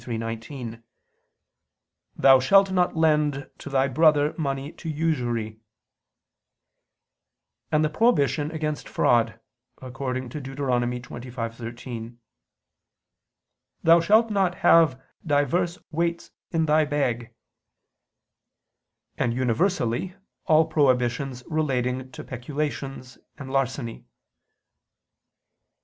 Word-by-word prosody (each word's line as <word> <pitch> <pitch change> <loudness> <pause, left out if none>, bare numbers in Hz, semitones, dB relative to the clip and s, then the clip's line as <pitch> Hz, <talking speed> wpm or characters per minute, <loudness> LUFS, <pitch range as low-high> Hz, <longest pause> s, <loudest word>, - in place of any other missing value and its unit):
23:19: 115 +1 -6 1.3
"Thou 135 -1 +6
shalt 195 +9 +4
not 180 -2 +1
lend 150 -3 +1
to - - -8
thy 135 0 +2
brother 150 +2 +3
money 140 -2 -3
to 165 - -8
usury"; 120 -9 -2 2.1
and 155 0 +3
the - - 0
prohibition 150 - +2
against 155 -2 -4
fraud, 115 -2 +2 0.4
according 130 0 -4
to 145 +5 -7
Deut. 135 0 -9
25:13: 120 -2 -4 1.7
"Thou 165 +1 +7
shalt 215 +6 +3
not 190 -3 +1
have 160 -6 +5 0.2
divers 165 +4 +1
weights 170 +1 -2 0.2
in 165 -1 +1
thy 155 0 +4
bag"; 125 -6 -2 1.8
and 115 - 0
universally 130 - 0 0.3
all 160 -1 +5
prohibitions 130 -4 +1
relating 130 -5 -1
to - - -9
peculations 135 0 -5 0.2
and 135 -2 -8
larceny. 130 -3 -2
135 Hz, 90 wpm, -25 LUFS, 125-155 Hz, 2.1 s, Thou